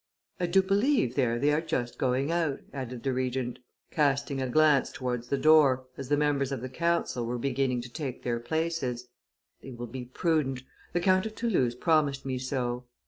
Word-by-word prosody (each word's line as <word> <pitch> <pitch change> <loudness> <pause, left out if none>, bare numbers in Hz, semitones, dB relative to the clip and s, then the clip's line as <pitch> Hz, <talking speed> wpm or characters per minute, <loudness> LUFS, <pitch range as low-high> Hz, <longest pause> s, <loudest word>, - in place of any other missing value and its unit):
I 175 - 0
do 190 +2 +4
believe, 200 - +2
there 125 -3 +1
they 145 +4 +2
are 150 - +2
just 120 -7 -3
going 130 +3 +1
out," 165 -5 0
added 125 -3 -6
the 135 - 0
Regent, 130 -1 -2 0.3
casting 140 -2 +1
a 130 - -2
glance 150 0 +4
towards 125 -3 -3
the 140 - 0
door, 140 -4 +5
as 135 -1 -7
the 145 - +3
members 145 -2 +1
of 135 -4 -3
the 130 - -5
council 170 -3 0
were 120 +1 -2
beginning 130 -1 0
to 120 0 -10
take 140 -6 -5
their 120 -1 -1
places: 130 -3 -2 0.5
"they - - -10
will 120 -1 -6
be 125 +1 -7
prudent; 135 -1 0 0.3
the 175 - +1
Count 185 +3 +3
of 215 - -9
Toulouse 175 - +1
promised 145 -1 +1
me 130 -1 -2
so." 125 -1 -2
135 Hz, 190 wpm, -28 LUFS, 125-155 Hz, 0.5 s, door